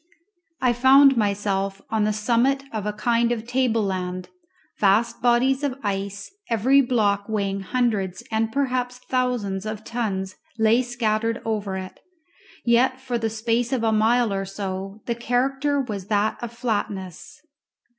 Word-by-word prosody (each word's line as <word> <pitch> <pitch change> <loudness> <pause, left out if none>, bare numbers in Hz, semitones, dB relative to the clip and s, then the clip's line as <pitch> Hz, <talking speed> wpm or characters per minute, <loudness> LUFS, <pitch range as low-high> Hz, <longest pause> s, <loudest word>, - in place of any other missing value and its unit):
I 250 -2 +3
found 270 +3 +6
myself 200 -2 0
on 220 -1 +2
the 215 - +2
summit 235 +6 +1
of 210 -2 -3
a - - 0
kind 235 +2 +1
of 230 -2 -2
table 245 -2 +1
land; 185 -2 -3 0.5
vast 210 +3 +2
bodies 250 +3 +3
of 275 -3 -2
ice, 200 0 -3 0.2
every 255 +5 +4
block 210 -5 +1
weighing 200 -2 -1
hundreds 200 -3 -1
and 220 0 0
perhaps 250 -2 -1
thousands 250 -7 -1
of 215 0 -5
tons 195 -6 -3 0.2
lay 225 +2 +4
scattered 230 -2 -1
over 205 -4 -2
it; 185 0 -8 0.7
yet 250 +2 +3
for 255 -2 -3
the 225 -1 -1
space 230 +2 -1
of 255 -4 0
a 225 - +2
mile 220 +1 +3
or 195 0 -1
so 195 +1 -6
the 235 - 0
character 270 +4 0
was 210 -8 -4
that 210 0 +1
of 240 -1 -5
flatness. 210 - -4
225 Hz, 145 wpm, -23 LUFS, 200-245 Hz, 0.7 s, found